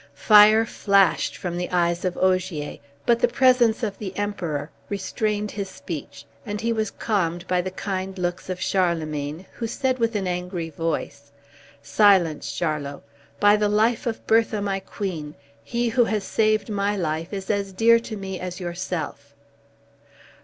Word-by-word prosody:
Fire 215 +1 +7
flashed 195 -9 +2
from 175 +1 -4
the 180 - -3
eyes 175 -1 +1
of 185 -2 -2
Ogier, 185 -5 0 0.3
but 235 -1 +3
the - - +4
presence 250 -3 +3
of 205 -3 -3
the 195 -3 -6
Emperor 170 -8 -3 0.2
restrained 205 +1 -2
his 200 -2 -4
speech, 150 -6 -8 0.2
and 205 -1 -4
he 230 +1 0
was 220 -2 -1
calmed 175 -6 -1
by 180 -1 +2
the 185 - -4
kind 190 0 -4
looks 175 +1 -3
of 185 0 -3
Charlemagne, 160 -4 -1
who 230 - -4
said, 255 +2 -1
with 230 -1 0
an 200 -2 -1
angry 180 -2 -3
voice, 150 -3 -4 0.5
"Silence, 175 -1 +3
Charlot! 150 -4 -3 0.4
By 205 0 +6
the 210 0 +1
life 220 +3 +2
of 225 - -4
Bertha, 225 -1 +3
my 200 -1 -1
queen, 175 -6 -5 0.3
he 240 0 -1
who 240 +1 +3
has 215 -3 -1
saved 215 +1 +1
my 205 0 0
life 165 -1 -2
is 195 -1 -3
as 200 -1 -1
dear 230 +4 +5
to 225 -2 -7
me 190 -1 -5
as 180 0 -5
yourself. 170 -5 -5
190 Hz, 160 wpm, -24 LUFS, 175-215 Hz, 0.5 s, Fire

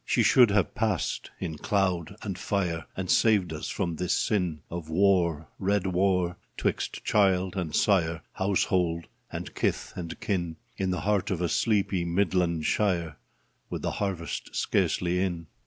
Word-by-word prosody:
She - - +2
should 125 -4 +6
have 100 -2 +2
passed 110 -7 -1
in 80 -2 -4
cloud 95 -2 0
and 100 -4 -3
fire 90 -3 -1
And 95 -1 -2
saved 100 -5 +3
us 75 - -5
from 85 -5 -2
this 90 -1 +1
sin 90 -8 0
Of 85 -2 -6
war 85 -3 +2
— - - -40
red 100 0 +1
Avar 90 -1 +1
— - - -42
'twixt - - -2
child 95 -2 +2
and 85 -5 -2
sire, 85 -6 +2
Household 90 -3 +1 0.3
and - - -6
kith - - -1
and 85 -2 -6
kin, 85 -5 -1 0.2
In 95 -1 -1
the 90 -2 -1
heart 105 +1 +1
of 95 -4 -1
a 90 - +1
sleepy 100 -3 +1
Midland 85 -2 +1
shire, 85 -7 0 0.5
With - - -4
the - - 0
harvest 95 -5 -3
scarcely 90 0 +1
in. 90 -3 -1
90 Hz, 160 wpm, -28 LUFS, 85-100 Hz, 0.5 s, should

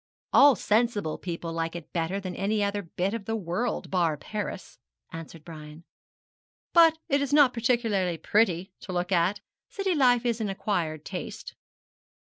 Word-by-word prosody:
'All 280 -1 +7
sensible 210 -5 0
people 170 -2 -5
like 165 0 -3
it 170 -2 -9
better 175 +3 -1
than 185 -2 -6
any 205 +2 0
other 200 0 -1
bit 185 +2 -3
of 230 -3 -5
the 225 - -2
world, 215 +4 -3
bar 170 -5 +1
Paris,' 210 +7 -6 0.3
answered 165 -1 -9
Brian. 155 -1 -10 0.9
'But 330 -2 +6
it 280 +1 +2
is 280 - -2
not 285 -4 +6
particularly 225 -7 0
pretty 190 +1 +1
to 185 - -7
look 180 +1 -2
at. 180 +3 +2 0.3
City 390 -2 -1
life 250 -5 +3
is 235 -1 0
an 210 - -1
acquired 170 -6 -2
taste.' - - -7
195 Hz, 155 wpm, -27 LUFS, 170-230 Hz, 0.9 s, All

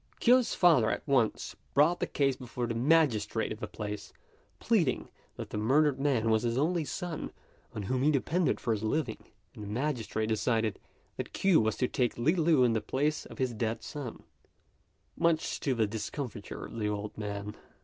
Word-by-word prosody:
Kuo's 250 0 +4
father 155 -11 +5
at - - -3
once 125 -6 +1 0.2
brought 155 +5 +4
the - - -1
case 135 -2 +1
before 125 -1 -4
the 115 - -2
magistrate 120 -4 +2
of 110 - -5
the - - -4
place, 105 -1 -6 0.5
pleading 180 - +1 0.3
that - - -7
the 105 - -2
murdered 135 +5 +3
man 125 -6 +2
was 110 0 +3
his 120 0 -1
only 165 +4 +1
son 175 +1 -4 0.5
on 105 - -3
whom 130 +6 -1
he 145 - +4
depended 155 +4 +1
for 115 - 0
his 105 - -3
living; 115 +1 -2 0.3
and 105 - -9
the - - -7
magistrate 115 -2 -2
decided 110 0 0 0.4
that - - -5
Kuo 195 -8 +4
was 110 -1 0
to 125 - +1
take 125 -2 -1
Li 130 +8 +3
Lu 160 -6 +4
in 120 -2 +3
the 110 - 0
place 150 +3 -1
of - - -12
his 130 -3 -1
dead 110 0 -2
son, 135 -3 -7 0.9
much 165 -1 +1
to 135 -3 0
the 115 -2 +2
discomfiture 110 +1 -5
of 115 - -8
the 105 -1 0
old 105 0 -4
man. 105 -1 -5
125 Hz, 185 wpm, -30 LUFS, 110-150 Hz, 0.9 s, father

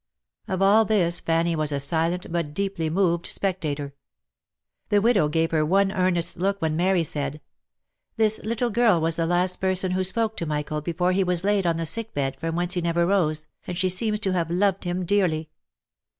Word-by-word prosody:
Of 190 0 -1
all 210 +3 +5
this 180 -6 +2
Fanny 165 +1 0
was 155 -1 -1
a 140 - -1
silent, 165 +5 0
but 165 -4 -3
deeply 195 -4 -2
moved 170 0 +1
spectator. 150 -7 -2 1.0
The 205 - +4
widow 205 -6 +3
gave 165 +1 0
her 155 -2 +2
one 195 +5 +2
earnest 180 -3 0
look 195 +3 -1
when 160 -3 -1
Mary 180 +1 +2
said, 145 -1 -3 0.4
" - - -56
This 220 -1 +2
little 230 +2 -1
girl 225 -5 +3
was 165 0 0
the 165 -1 0
last 180 +1 +1
person 185 -1 +1
who 185 +1 0
spoke 220 +3 +1
to 170 - -3
Michael 150 0 -2
before 175 +3 0
he 190 +1 +2
was 180 -1 0
laid 200 -2 +1
on 165 -1 +1
the 165 - -2
sick 225 +6 -2
bed 135 -1 -1
from 165 0 -3
whence 175 +1 0
he 180 - -1
never 170 0 +1
rose, 155 -5 +1 0.2
and 180 - -4
she 185 0 +1
seems 210 +3 0
to 190 -2 +1
have 170 -2 -1
loved 190 +2 0
him 175 +1 -2
dearly." 165 -5 0
175 Hz, 200 wpm, -24 LUFS, 165-195 Hz, 1.0 s, all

